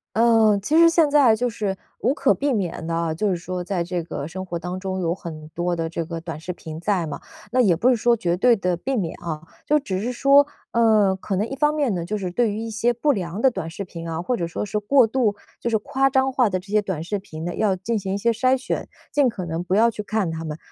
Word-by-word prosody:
呃。 225 -2 +5
其 300 +11 +1
实 335 0 +8
现 330 -3 +3
在 280 -6 +5
就 245 +2 0
是， 205 -4 -3 0.2
无 250 +5 +2
可 275 -1 +3
避 285 0 -1
免 190 -8 -2
地 165 - -2
啊， 165 -1 0
就 200 +6 0
是 185 - +1
说 180 +1 -5
在 180 -1 -1
这 175 -1 -3
个 145 -3 -5
生 185 +3 -6
活 175 -2 -4
当 180 +2 -5
中 190 0 -3
有 170 -2 0
很 160 -4 -8
多 175 +2 -2
的 165 -1 -2
这 165 0 -3
个 165 0 -5
短 165 -3 -6
视 175 +3 -5
频 160 -3 -8
在 190 -3 0
嘛。 150 - -6 0.3
那 255 +1 +3
也 195 -8 +4
不 230 +10 +3
是 255 - +5
说 235 +1 +2
绝 175 -4 0
对 240 +6 +4
地 180 -4 0
避 265 +10 -3
免 175 -6 -2
啊， 155 -3 -4 0.2
就 300 +1 +3
只 190 -9 -3
是 240 +4 -2
说， 275 +3 +5 0.3
呃， 215 -4 +4
可 190 +1 -4
能 205 +4 0
一 270 - -5
方 295 +2 +2
面 285 -8 +1
呢， 175 - -2
就 210 +5 -3
是 185 -3 -4
对 230 +2 +1
于 205 - -4
一 225 - -4
些 225 +2 +1
不 290 +6 +1
良 185 -5 -3
的 265 - +5
短 165 -8 -5
视 195 +4 -6
频 170 -2 -7
啊， 165 +1 -3
或 245 +8 -1
者 170 -6 -2
说 170 - -4
是 210 +1 -2
过 250 +5 +4
度 225 -3 +1 0.3
就 235 - -1
是 225 - +2
夸 270 +5 +1
张 265 0 +2
化 250 -5 +3
的 185 -1 -1
这 185 - -16
些 210 0 +3
短 185 -6 -4
视 200 +4 -2
频 160 -4 -8
呢， 175 - -3
要 205 -3 +1
进 220 +5 -2
行 190 -1 -3
一 - - 0
些 230 +3 +2
筛 255 +4 +2
选， 255 - -4 0.2
尽 285 -3 +4
可 195 -6 -5
能 165 +1 -3
不 180 +1 0
要 230 +3 +5
去 215 - -5
看 210 -4 -1
它 160 0 -5
们。 155 -1 -5
200 Hz, 300 characters per minute, -23 LUFS, 175-235 Hz, 0.3 s, 实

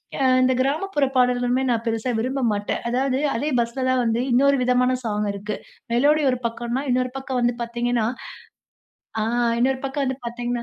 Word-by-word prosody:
யா 275 - 0 0.2
இந்த 255 0 +3
கிராமப்புற 290 +3 +1
பாடல்களுமே 250 0 +2
நான் 230 -2 0
பெருசா 230 +2 -1
விரும்ப 260 +4 -1
மாட்டேன். 205 0 -2
அதாவது, 260 +2 0 0.2
அதே 285 +6 -1
பஸ்ல 235 +3 -1
தான் 255 0 +2
வந்து 230 0 +1
இன்னொரு 275 +3 +4
விதமான 250 0 +2
ஸாங் 210 -2 -1
இருக்கு. 205 +1 -4 0.4
மெலோடி 290 +6 +4
ஒரு 250 - -1
பக்கம்ன்னா, 235 +2 -2
இன்னொரு 255 0 +1
பக்கம் 265 -1 -3
வந்து 240 0 +2
பாத்தீங்கன்னா 235 -1 -1 1.2
ஆ, - - +1 0.4
இன்னொரு 260 +2 +2
பக்கம் 275 +1 -1
வந்து 260 0 -2
பாத்தீங்கன்னா, 240 0 -3
250 Hz, 165 wpm, -23 LUFS, 235-265 Hz, 1.2 s, இன்னொரு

